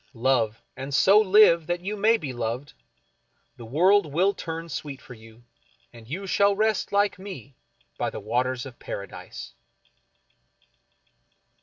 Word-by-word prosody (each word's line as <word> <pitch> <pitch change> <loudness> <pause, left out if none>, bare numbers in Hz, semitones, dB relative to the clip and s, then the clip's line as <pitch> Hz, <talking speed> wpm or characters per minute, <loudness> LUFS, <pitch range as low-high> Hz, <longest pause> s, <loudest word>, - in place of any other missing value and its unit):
Love, 115 -3 +1
and 135 +1 -4
so 195 +7 +6
live 190 -5 +5
that 175 0 -2
you 200 +4 -3
may 220 +3 +3
be 140 -10 -6
loved 120 +4 -4 0.4
— - - -45
the 120 - -10
world 175 - +3
will 185 +7 +2
turn 165 -2 -6
sweet 140 -3 -6
for 125 - -12
you, 115 0 -16 0.5
and 115 -2 -14
you 190 +7 -5
shall 200 +1 +3
rest 215 0 0
like 200 -1 +1
me 165 - -9 0.5
by - - 0
the - - -7
Waters 125 +4 -1
of 130 -3 -11
Paradise. 100 -1 -8
150 Hz, 145 wpm, -25 LUFS, 125-195 Hz, 0.5 s, so